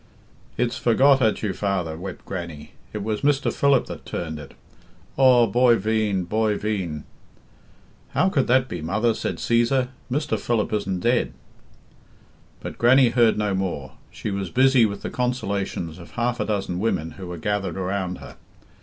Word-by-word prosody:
"It's 125 Hz, +1 st, 0 dB
forgot 135 Hz, +3 st, +4 dB
at 110 Hz, -2 st, +1 dB
you 100 Hz, -3 st, 0 dB
father," 95 Hz, -6 st, -2 dB
wept 90 Hz, +3 st, -8 dB
Grannie. 85 Hz, -5 st, -6 dB, 0.2 s
"It 105 Hz, -2 st, -4 dB
was 105 Hz, 0 st, -2 dB
Mr. 145 Hz, 0 st, +2 dB
Philip 140 Hz, -2 st, +3 dB
that -, -, -8 dB
turned 80 Hz, -3 st, -5 dB
it. 70 Hz, -2 st, -11 dB, 0.6 s
Aw 125 Hz, -3 st, +6 dB
boy 120 Hz, +3 st, +4 dB
veen! 105 Hz, -2 st, 0 dB
boy 105 Hz, +3 st, 0 dB
veen!" 95 Hz, -8 st, -3 dB, 1.1 s
"How 185 Hz, -, +3 dB
could 140 Hz, -8 st, +1 dB
that 130 Hz, +1 st, +3 dB
be, 90 Hz, -8 st, -5 dB
mother?" 105 Hz, +8 st, +1 dB
said -, -, -3 dB
Cæsar. 120 Hz, +2 st, +2 dB, 0.2 s
"Mr. 140 Hz, -5 st, 0 dB
Philip 110 Hz, -1 st, -1 dB
isn't 95 Hz, -3 st, -1 dB
dead." 120 Hz, +4 st, +1 dB, 1.3 s
But -, -, -7 dB
Grannie 130 Hz, +1 st, +6 dB
heard 115 Hz, -2 st, +3 dB
no 105 Hz, -2 st, 0 dB
more. 90 Hz, -8 st, -3 dB, 0.2 s
She 105 Hz, -, -5 dB
was 95 Hz, -2 st, -3 dB
busy 130 Hz, -1 st, +4 dB
with 100 Hz, -1 st, -7 dB
the -, -, -4 dB
consolations 100 Hz, -, -2 dB
of 85 Hz, -, -13 dB
half 120 Hz, 0 st, -1 dB
a -, -, 0 dB
dozen 95 Hz, -4 st, -2 dB
women 80 Hz, -7 st, -1 dB
who 95 Hz, +3 st, -9 dB
were 90 Hz, -1 st, -6 dB
gathered 100 Hz, 0 st, -2 dB
around 95 Hz, -1 st, -2 dB
her. -, -, -12 dB
105 Hz, 165 wpm, -23 LUFS, 95-120 Hz, 1.3 s, Aw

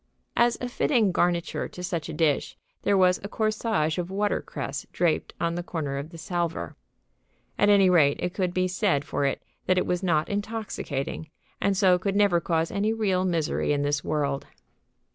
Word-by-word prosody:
As 235 Hz, 0 st, +3 dB
a 250 Hz, -, -3 dB
fitting 240 Hz, -4 st, +2 dB
garniture 175 Hz, -1 st, 0 dB
to 180 Hz, -, -9 dB
such 170 Hz, -3 st, -3 dB
a -, -, -4 dB
dish, 150 Hz, -3 st, 0 dB, 0.2 s
there 200 Hz, -, +2 dB
was 180 Hz, -1 st, +4 dB
a -, -, -3 dB
corsage 215 Hz, -8 st, 0 dB
of 175 Hz, 0 st, -3 dB
watercress 205 Hz, +2 st, -2 dB
draped 170 Hz, -3 st, 0 dB
on 170 Hz, -1 st, 0 dB
the 175 Hz, -, -2 dB
corner 150 Hz, -6 st, -3 dB
of 145 Hz, +3 st, -6 dB
the 170 Hz, -, -11 dB
salver. 165 Hz, -, -3 dB, 0.8 s
At 205 Hz, -, +4 dB
any 200 Hz, -2 st, +6 dB
rate, 155 Hz, -6 st, +4 dB
it 180 Hz, 0 st, -2 dB
could 185 Hz, -3 st, 0 dB
be 185 Hz, 0 st, +1 dB
said 180 Hz, -6 st, +1 dB
for 140 Hz, -, -1 dB
it 135 Hz, -, -1 dB, 0.2 s
that 185 Hz, -, +3 dB
it 185 Hz, -, +2 dB
was 180 Hz, 0 st, -1 dB
not 160 Hz, -5 st, +1 dB
intoxicating, 200 Hz, -9 st, -4 dB, 0.3 s
and 200 Hz, -1 st, +2 dB
so 185 Hz, -3 st, +4 dB
could 195 Hz, +1 st, -1 dB
never 200 Hz, -4 st, +4 dB
cause 165 Hz, 0 st, 0 dB
any 210 Hz, +2 st, +1 dB
real 195 Hz, -4 st, +1 dB
misery 165 Hz, -5 st, 0 dB
in 145 Hz, 0 st, 0 dB
this 145 Hz, 0 st, 0 dB
world. 140 Hz, -2 st, -1 dB
180 Hz, 180 wpm, -26 LUFS, 160-200 Hz, 0.8 s, any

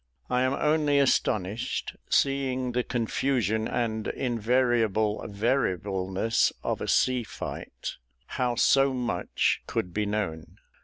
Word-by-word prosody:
I 125 Hz, 0 st, +2 dB
am 130 Hz, +1 st, +2 dB
only 150 Hz, -1 st, +2 dB
astonished, 110 Hz, -6 st, 0 dB
seeing 130 Hz, -2 st, +1 dB
the 125 Hz, +1 st, +1 dB
confusion 115 Hz, -2 st, 0 dB
and 110 Hz, -3 st, -2 dB
invariable 115 Hz, -3 st, +1 dB
variableness 100 Hz, -2 st, 0 dB
of -, -, -2 dB
a -, -, -3 dB
sea 130 Hz, -1 st, +2 dB, 0.2 s
light, -, -, -6 dB, 0.3 s
how 125 Hz, -2 st, -1 dB
so 135 Hz, +2 st, +4 dB
much 120 Hz, -8 st, 0 dB
could 90 Hz, -, -2 dB
be 105 Hz, +1 st, -1 dB
known. 100 Hz, -7 st, -3 dB
120 Hz, 110 wpm, -27 LUFS, 105-130 Hz, 0.3 s, so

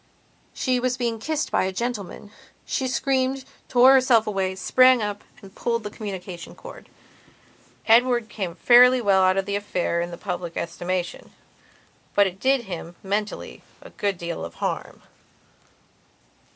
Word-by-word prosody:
She 255 Hz, -2 st, 0 dB
was 250 Hz, 0 st, -1 dB
being 235 Hz, -3 st, -2 dB
kissed 310 Hz, +6 st, -2 dB
by -, -, +2 dB
a 190 Hz, -, -2 dB
gentleman. 205 Hz, -1 st, -5 dB, 0.3 s
She 265 Hz, -, -2 dB
screamed, 265 Hz, 0 st, 0 dB, 0.2 s
tore 255 Hz, +1 st, +6 dB
herself 255 Hz, -4 st, +4 dB
away; 190 Hz, -2 st, -2 dB
sprang 255 Hz, +7 st, +4 dB
up 205 Hz, -1 st, -4 dB, 0.2 s
and 195 Hz, -1 st, -13 dB
pulled 230 Hz, -2 st, -2 dB
a 210 Hz, -, -5 dB
communication 190 Hz, -5 st, -7 dB
cord. -, -, -12 dB, 1.0 s
Edward 240 Hz, 0 st, +4 dB
came 190 Hz, -6 st, -5 dB
fairly 250 Hz, +6 st, +6 dB
well 200 Hz, -4 st, +3 dB
out 185 Hz, 0 st, +3 dB
of 195 Hz, -, 0 dB
the 200 Hz, 0 st, -2 dB
affair 180 Hz, -4 st, -1 dB
in 175 Hz, -, -3 dB
the 170 Hz, -, -8 dB
public 180 Hz, -3 st, -5 dB
estimation; 175 Hz, +1 st, -4 dB, 0.8 s
but 205 Hz, -, +5 dB
it 190 Hz, 0 st, -4 dB
did 265 Hz, +1 st, +2 dB
him, 175 Hz, -3 st, -7 dB
mentally, 205 Hz, +2 st, -4 dB, 0.2 s
a -, -, -14 dB
good 200 Hz, -2 st, -2 dB
deal 170 Hz, -, -5 dB
of 85 Hz, 0 st, -8 dB
harm. -, -, -4 dB
205 Hz, 150 wpm, -24 LUFS, 185-250 Hz, 1.0 s, tore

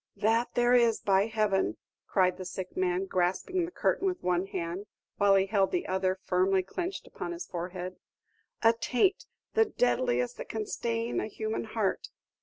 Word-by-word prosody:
"That 225 Hz, +3 st, +1 dB
there 240 Hz, 0 st, +4 dB
is, 235 Hz, -3 st, +4 dB
by 195 Hz, +1 st, +3 dB
Heaven!" 215 Hz, -3 st, +1 dB, 0.3 s
cried 185 Hz, -2 st, +2 dB
the 185 Hz, -, -6 dB
sick 185 Hz, 0 st, -6 dB
man, 185 Hz, +1 st, +1 dB
grasping 190 Hz, -, 0 dB
the 345 Hz, -, -8 dB
curtain 390 Hz, -, +1 dB
with 360 Hz, -1 st, -2 dB
one 180 Hz, +1 st, +1 dB
hand, 180 Hz, +2 st, -4 dB, 0.3 s
while 200 Hz, -1 st, +5 dB
he 195 Hz, 0 st, +4 dB
held 195 Hz, -1 st, +2 dB
the 360 Hz, 0 st, -1 dB
other 185 Hz, 0 st, 0 dB
firmly 185 Hz, +1 st, +2 dB
clenched 355 Hz, -, -4 dB
upon 345 Hz, -, -6 dB
his 345 Hz, +1 st, -6 dB
forehead, 180 Hz, +1 st, -5 dB, 0.7 s
"a 225 Hz, 0 st, +7 dB
taint, 250 Hz, -, +1 dB, 0.3 s
the 445 Hz, 0 st, +5 dB
deadliest 245 Hz, -, +1 dB
that -, -, -7 dB
can 220 Hz, -1 st, -3 dB
stain 230 Hz, +2 st, -2 dB
a -, -, -2 dB
human 220 Hz, +1 st, -3 dB
heart! 220 Hz, -3 st, -1 dB
205 Hz, 170 wpm, -29 LUFS, 185-235 Hz, 0.7 s, a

